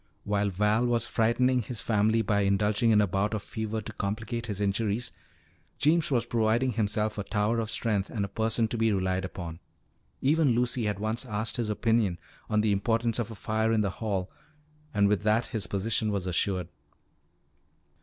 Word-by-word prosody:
While 105 0 0
Val 105 +5 +2
was 120 -1 +2
frightening 125 +3 +2
his 115 +1 -6
family 110 +1 +2
by 100 0 +1
indulging 105 +3 +2
in 105 -2 +5
a - - +4
bout 100 +3 0
of 105 - -4
fever 110 0 -4
to 110 +2 -8
complicate 115 +4 -3
his 100 -3 -3
injuries, 105 +3 0 0.7
Jeems 155 +3 +3
was 125 -5 +1
proving 115 +3 +1
himself 105 -1 -1
a - - -1
tower 105 +3 0
of 110 -1 -2
strength 105 -4 -1
and 105 -4 -2
a - - -5
person 110 +2 +1
to 115 - -3
be 115 0 +3
relied 95 -1 0
upon. 85 -3 -7 0.6
Even 145 -2 +3
Lucy 120 -1 +1
had 105 -2 -1
once 110 +4 -1
asked 110 -2 -2
his 115 -3 -1
opinion 105 -3 +1 0.3
on 105 0 +2
the 105 -1 +2
importance 115 +3 +1
of 115 - -2
a 110 - -8
fire 110 +2 0
in 110 -1 +3
the 100 -3 0
hall, 100 -4 -2 0.6
and 100 -2 +3
with 105 0 +1
that 110 +3 +2
his 110 -2 -3
position 105 +2 0
was 100 -3 -2
assured. 90 0 0
110 Hz, 185 wpm, -28 LUFS, 100-115 Hz, 0.7 s, in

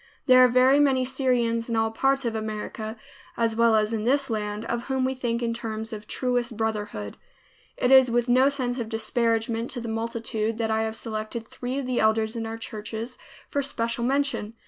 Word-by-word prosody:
There 255 -1 +7
are - - +8
very 255 +3 +5
many 265 -3 +3
Syrians 245 -3 0
in 230 - 0
all 225 0 +1
parts 270 +3 +1
of 230 - 0
America, 220 0 -5 0.4
as 230 -1 +1
well 230 -1 +4
as 215 +1 +2
in 215 -1 -1
this 270 +2 +1
land, 210 0 -3
of 235 +1 -3
whom 265 -1 0
we 260 - 0
think 240 -2 -2
in 230 0 0
terms 225 -1 -5
of 210 0 -8
truest 245 -2 -1
brotherhood. 210 - -3 0.6
It 250 - +1
is 265 -2 +8
with 240 +1 +1
no 255 +3 +5
sense 255 -3 -1
of 225 -2 -4
disparagement 230 0 0
to 250 - -4
the 235 - -6
multitude 225 -1 -2
that 225 -1 -1
I 220 0 +1
have 220 0 -2
selected 220 +1 -4
three 250 +2 -5
of 280 - -2
the 250 -1 0
elders 220 +1 +2
in 225 -1 -3
our 225 0 -5
churches 225 +2 -6 0.3
for 285 - -1
special 235 -3 -2
mention. 270 -4 0
230 Hz, 200 wpm, -25 LUFS, 220-255 Hz, 0.6 s, are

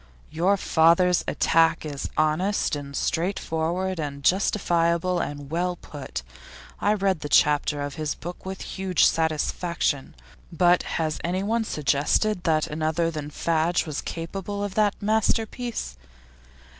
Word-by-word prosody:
'Your 180 +5 +2
father's 170 +1 +4
attack 165 0 +2
is 145 -2 -4
honest 155 +5 +1
and 140 -1 -7
straightforward 175 +1 -1
and 140 -2 -4
justifiable 175 -1 +2
and 145 0 -5
well 175 +2 0
put. 135 - -7 0.6
I 210 +1 +2
read 195 -4 +1
that 145 -1 -6
chapter 145 0 +3
of 145 0 -4
his 150 -1 -1
book 175 +1 -8
with 190 0 -6
huge 190 -2 +1
satisfaction. 160 -2 0 0.4
But 175 +1 +4 0.2
has 155 -2 -1
anyone 200 +6 0
suggested 155 +6 +1
that 155 -2 +2
another 160 +2 -1
than 150 -2 -5
Fadge 165 +3 0
was 150 -3 -4
capable 195 +4 -5
of 205 -2 -3
that 210 0 +1
masterpiece? 220 - -1
170 Hz, 125 wpm, -25 LUFS, 155-190 Hz, 0.6 s, father's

